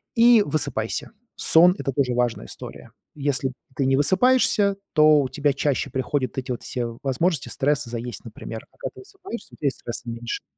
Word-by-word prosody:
И 235 -2 +7
высыпайся. 140 - -2 0.3
Сон- 175 +2 +6
это 135 - -1
тоже 130 -2 0
важная 120 -1 0
история. - - -10 0.2
Если 140 -2 -1 0.2
ты 135 0 0
не 135 0 +3
высыпаешься, 200 - +3 0.2
то 155 -2 +6
у 135 - -1
тебя 145 +1 +1
чаще 140 0 0
приходят 130 0 -2
эти 130 0 -3
вот 120 - -4
все 120 -2 -4
возможности, 145 +3 0
стресс 145 -1 0
и - - -8
заесть, 120 -1 -5
например. 115 0 -8
А - - -29
когда - - -7
высыпаешься, 385 - -9
у - - -13
тя 145 - -1
и - - +5
стресса 120 - -7
меньше. 115 0 -5
140 Hz, 180 wpm, -24 LUFS, 125-165 Hz, 0.3 s, И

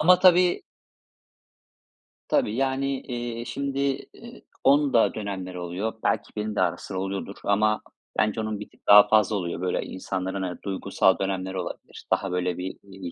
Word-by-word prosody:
ama 180 +3 +6
tabii 180 -1 +5 1.7
Tabii, 105 - +1
yani, 135 +1 0
iii, 120 -1 -5
şimdi, 140 +2 -3 0.3
iii, 235 0 -13 0.2
onun 140 +1 +4
da 115 - +4
dönemleri 95 -4 -5
oluyor. 90 +6 -3
Belki 105 -2 0
benim 105 0 -3
de - - +1
ara 85 0 +1
sıra 95 +1 -5
oluyordur 95 +1 -4
ama 105 +1 +2 0.4
bence 105 +1 +1
onun 110 -1 -3
bir 105 - -8
tık - - -29
daha 105 0 +9
fazla 110 0 +3
oluyor. 85 -3 -3
Böyle, 90 -1 0
insanların, 95 +1 -4
ııı, 90 -1 -4
duygusal 95 -1 +1
dönemleri 95 -1 -2
olabilir. 90 -1 -7
Daha 100 -2 +1
böyle, 90 -1 -1
bir, 95 +1 -5
iii, 95 -3 -8
100 Hz, 160 wpm, -25 LUFS, 95-120 Hz, 1.7 s, daha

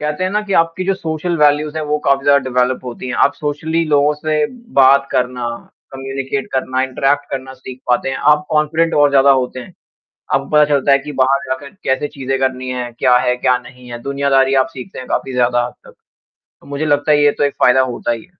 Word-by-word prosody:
कहते 150 +4 -2
हैं 185 - -1
ना 210 +1 0
कि 200 - -3
आपकी 165 +2 -3
जो 195 - +1
सोशल 170 -1 -3
वैल्यूज़ 150 +1 +2
हैं 155 - -3
वो 150 0 -1
काफ़ी 140 0 +2
ज़्यादा 140 0 +5
डेवेलप 125 +1 +1
होती 125 +1 -7
हैं। 125 - -3
आप 140 - +3
सोशली 160 +3 -2
लोगों 145 0 +3
से 150 0 -1 0.3
बात 140 +1 +5
करना 125 -1 -1 0.5
कम्युनिकेट 135 0 -4
करना 130 0 -1
इंट्रैक्ट 135 +2 -1
करना 130 -1 -5
सीख 130 -1 -11
पाते 125 +2 +1
हैं। 130 - -3 0.2
आप 150 0 0
कॉन्फिडेंट 155 +2 +1
और 145 -1 +4
ज़्यादा 140 0 +5
होते 130 -1 0
हैं। 125 - -12 0.6
अपको - - 0
पता 150 0 +5
चलता 140 -1 +2
है 140 - +5
कि 150 +2 -8
बाहर 135 +1 +3
जाकर 130 +2 -4
कैसे 130 +3 0
चीज़ें 135 -1 -3
करनी 130 -1 -2
हैं, 125 -1 -4
क्या 125 +1 +3
है, 125 0 +1
क्या 125 0 +2
नहीं 125 0 -14
है, 120 - -6
दुनियादारी 140 -1 +1
आप - - -9
सीख 130 +7 -8
सकते - - -10
हैं 130 - -9
काफ़ी 130 - -2
ज़्यादा 120 -1 +1
हद - - -8
तक। - - -15 0.7
तो - - -20
मुझे 140 +2 -4
लगता 145 +1 +2
है 145 - +4
ये 145 - +5
तो - - +2
एक 140 - -1
फ़ायदा 125 +1 +5
होता 120 - -4
ही 115 - -4
है। - - -17
140 Hz, 230 wpm, -17 LUFS, 130-150 Hz, 0.7 s, ज़्यादा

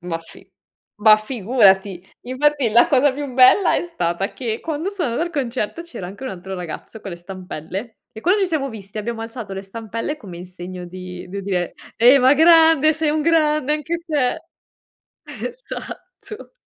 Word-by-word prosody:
Ma 175 -2 -4
fi 165 - -17 0.5
ma 215 0 +8
figurati! 205 -5 +2 0.2
Infatti 275 +1 +1
la 235 +9 +5
cosa 285 -2 +4
più 280 0 -5
bella, 255 +9 +6
è - - -1
stata 185 - -2
che 230 -3 -3
quando 320 +4 -3
sono 335 - -2
o 340 +6 -1
concerto, 255 -3 -3
c'era 335 - -8
anche 205 +8 -9
un - - -3
altro 190 +1 -7
ragazzo 180 +5 -8
con 195 - -7
le - - -6
stampelle 185 +4 -7
e 220 - -9
quando 370 - +2
ci 385 - +2
siamo 300 -5 -1
visti, 210 -3 -9
abbiamo 225 +2 -4
alzato 225 -3 -7
le 195 - -5
stampelle, 230 +7 -5
come 185 -9 -10
in 175 - -8
segno 180 0 -8
di 180 0 -9
di 200 +2 -5
dire: 180 -3 -2 0.2
"Ehi, 245 +4 +7
ma 260 +2 +5
grande. 320 -1 +6
Sei 310 -1 0
un 305 0 0
grande 305 -3 +2
anche 305 +3 -3
te." 295 -1 0 0.9
Esatto. - - -9
235 Hz, 175 wpm, -21 LUFS, 195-300 Hz, 0.9 s, ma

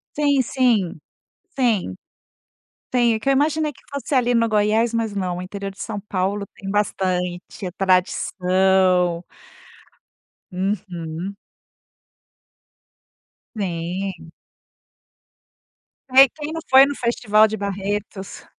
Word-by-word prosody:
Sim, 285 -2 +3
sim, 230 -10 +1 0.6
sim. 215 - +1 1.0
Tem, 240 -2 +3
é - - -1
que 245 - -3
eu - - +5
imaginei 300 +2 +1
que - - -21
fosse, 280 +1 -3
ali, 245 -2 +2
no 230 -1 +3
Goiás, 215 +2 +2
mas 225 -2 -1
não, 185 -3 -2
o 180 - -5
interior 195 +1 -6
de 195 - -17
São 205 - -4
Paulo 200 +2 -1
tem 195 - -6
bastante, 185 -3 -1 0.2
é 185 - -3
tradição. 185 -1 +2 1.3
Uhum. 185 -1 -4 2.2
Sim. 180 -2 -4 1.8
Ei, 265 +1 +8
quem 300 +2 -7
não 325 0 -4
foi 265 +1 +8
no 285 - -3
festival 220 -3 +3
de 220 - -4
Barretos? 200 0 -4
200 Hz, 110 wpm, -21 LUFS, 185-235 Hz, 2.2 s, Ei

